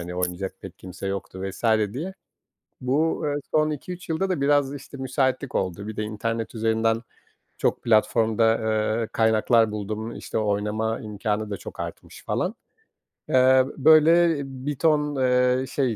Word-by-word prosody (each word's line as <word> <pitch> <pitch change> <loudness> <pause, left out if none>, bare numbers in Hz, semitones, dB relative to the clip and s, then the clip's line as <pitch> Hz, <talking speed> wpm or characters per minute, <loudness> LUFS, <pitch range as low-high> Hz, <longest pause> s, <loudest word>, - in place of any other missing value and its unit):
hani, 90 +1 -6
oynayacak 90 +1 -2
pek 95 -1 -10
kimse 95 +1 -8
yoktu 95 -1 -5
vs. 95 +4 -6 0.3
diye. 175 +8 -4 0.7
Bu, 145 +6 0
eee, 145 - 0 0.2
son 155 0 +3
2-3 180 +5 -7
yılda 175 +4 0
da 180 -6 -1
biraz, 145 -1 +2
işte, 140 0 -10
müsaitlik 130 0 -1
oldu. 95 +2 -2
Bir 110 - -6
de 110 - -1
internet 115 +2 -3
üzerinden 115 0 +1 0.6
çok - - 0
platformda, 115 0 +3 0.4
eee, 115 - -2
kaynaklar 110 0 +3
buldum. 110 +2 -4
İşte, - - -4
oynama 105 +1 -1
imkânı 105 0 -3
da 100 - -2
çok - - -9
artmış - - -8
falan. - - -1 0.8
Eee, 130 0 +5
böyle, 160 +2 +5
bir 135 +2 -5
ton, 150 -2 +2
eee, 125 0 +2
şey, 130 -5 0
115 Hz, 145 wpm, -24 LUFS, 105-140 Hz, 0.8 s, Eee